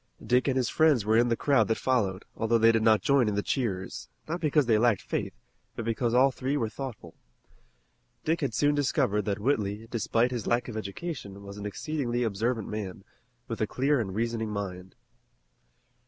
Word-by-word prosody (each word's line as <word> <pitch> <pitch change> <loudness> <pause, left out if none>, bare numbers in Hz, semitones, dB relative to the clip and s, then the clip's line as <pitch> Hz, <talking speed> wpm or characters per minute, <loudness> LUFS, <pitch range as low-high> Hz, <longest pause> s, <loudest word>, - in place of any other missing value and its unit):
Dick 125 +2 +2
and 135 -1 +1
his 125 -2 +1
friends 150 -8 +3
were 110 +1 +3
in 120 +2 +4
the 115 - +2
crowd 130 -8 +3
that 110 - +1
followed, 105 -8 0
although 115 +1 +2
they 115 0 +6
did 115 -1 +1
not 110 -3 +4
join 135 -2 +3
in 105 - 0
the 105 - 0
cheers, 100 -9 -3 0.2
not 170 +2 -3
because 150 -2 +3
they 110 -3 +3
lacked 115 -4 +2
faith, - - -3 0.4
but 115 - -5
because 115 +1 0
all 130 +3 +5
three 135 +3 -2
were 115 -5 -1
thoughtful. 115 -9 -7 1.1
Dick 165 +2 +1
had 135 -7 -1
soon 145 +3 +3
discovered 130 -7 +1
that 100 -2 -1
Whitley, 105 -3 -1
despite 115 +1 +1
his 120 -4 -4
lack 120 0 +1
of 120 - -6
education, 100 - -6
was 100 0 -9
an 105 - -4
exceedingly 125 +1 -2
observant 110 +1 -1
man, 100 -3 -5 0.4
with 115 - -5
a 110 - +2
clear 140 +5 +1
and 95 -5 -3
reasoning 115 0 -1
mind. 95 -3 -5
115 Hz, 190 wpm, -28 LUFS, 105-130 Hz, 1.1 s, they